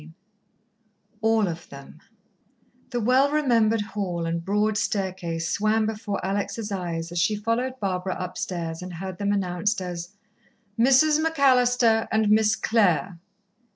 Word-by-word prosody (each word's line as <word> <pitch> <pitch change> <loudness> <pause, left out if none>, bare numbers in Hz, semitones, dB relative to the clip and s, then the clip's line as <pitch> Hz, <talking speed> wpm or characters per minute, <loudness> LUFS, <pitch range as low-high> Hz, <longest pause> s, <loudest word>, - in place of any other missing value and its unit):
XXIV 160 +2 -14 1.1
All 220 -2 +2
of 170 0 -6
Them 140 +2 -12 0.9
The 245 -2 -2
well 255 +5 +3
remembered 230 -7 +2
hall 195 -5 -3
and 165 0 -2
broad 210 +3 +1
staircase 185 -6 -2
swam 215 +3 +1
before 215 -2 -3
Alex' 205 +2 -3
eyes 170 -3 -4
as 175 - -2
she 210 +5 +2
followed 235 +5 -2
Barbara 185 -2 -2
upstairs 170 -2 -4
and 180 0 -7
heard 185 +2 -7
them 200 0 0
announced 200 +2 0
as: 175 +1 -6 0.6
"Mrs. 270 +5 +5
McAllister 250 -7 +3
and 220 -1 +2
Miss 215 0 +4
Clare!" 190 -6 +1
205 Hz, 130 wpm, -25 LUFS, 180-225 Hz, 1.1 s, Mrs